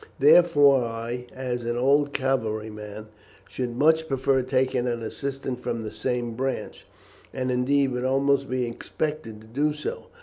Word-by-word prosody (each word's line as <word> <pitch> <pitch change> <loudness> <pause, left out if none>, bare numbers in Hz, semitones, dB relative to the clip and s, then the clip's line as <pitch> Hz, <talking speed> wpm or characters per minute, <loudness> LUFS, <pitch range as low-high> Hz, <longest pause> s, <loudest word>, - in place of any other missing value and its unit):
Therefore 145 -3 +6
I, 115 +2 -5
as 125 -2 -4
an 120 +1 -2
old 140 +3 +3
cavalry 115 -6 -1
man, 105 0 -9 0.4
should 125 -2 -4
much 160 +2 +3
prefer 135 -1 +1
taking 130 -1 0
an 120 -1 -2
assistant 135 +1 -4
from 115 -2 -3
the 110 - -5
same 120 -2 -2
branch, 130 +3 -4 0.4
and 130 -1 -2
indeed 135 +2 +2
would 125 0 -2
almost 135 +1 +2
be 130 -1 0
expected 120 -1 -4
to - - -15
do 145 +6 0
so. 150 - -6
130 Hz, 155 wpm, -25 LUFS, 120-140 Hz, 0.4 s, Therefore